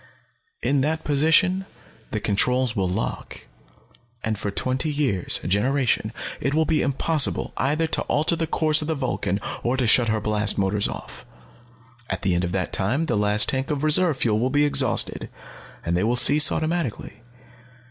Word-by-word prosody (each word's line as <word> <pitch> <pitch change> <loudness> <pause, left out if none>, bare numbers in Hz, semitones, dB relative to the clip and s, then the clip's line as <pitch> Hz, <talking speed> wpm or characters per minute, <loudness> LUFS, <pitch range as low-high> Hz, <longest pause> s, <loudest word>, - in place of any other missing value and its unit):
In 140 -1 +1
that 155 +3 -2
position 165 +6 +2 0.4
the 110 - -3
controls 125 +4 0
will 95 -2 -1
lock. 100 +5 -5 0.8
And 110 0 -1
for 100 0 -4
twenty 130 +8 -1
years, 135 - 0
a - - -5
generation, 125 +7 0 0.3
it 140 +1 -2
will 160 0 +2
be 155 0 0
impossible 140 +2 +1
either 150 +5 0
to 160 - -1
alter 155 +3 0
the 165 -1 -3
course 155 0 +2
of 150 - -5
the 160 - -1
Vulcan 105 -8 -2 0.2
or 125 +2 -1
to 130 - 0
shut 115 +1 +3
her 110 0 0
blast 105 0 -1
motors 100 +1 0
off. - - -9 0.9
"At - - -4
the 95 -3 +1
end 90 +1 0
of 90 - -3
that 95 -1 -3
time 130 +12 0
the - - -1
last 105 0 +1
tank 135 0 -1
of 150 -1 -3
reserve 155 0 +3
fuel 110 -4 0
will 125 +3 0
be 145 +2 +2
exhausted, 140 -4 +2 0.6
and 85 +1 -1
they 90 - 0
will 115 +3 +1
cease 145 +4 +6
automatically. 155 -8 -3
130 Hz, 175 wpm, -23 LUFS, 105-150 Hz, 0.9 s, cease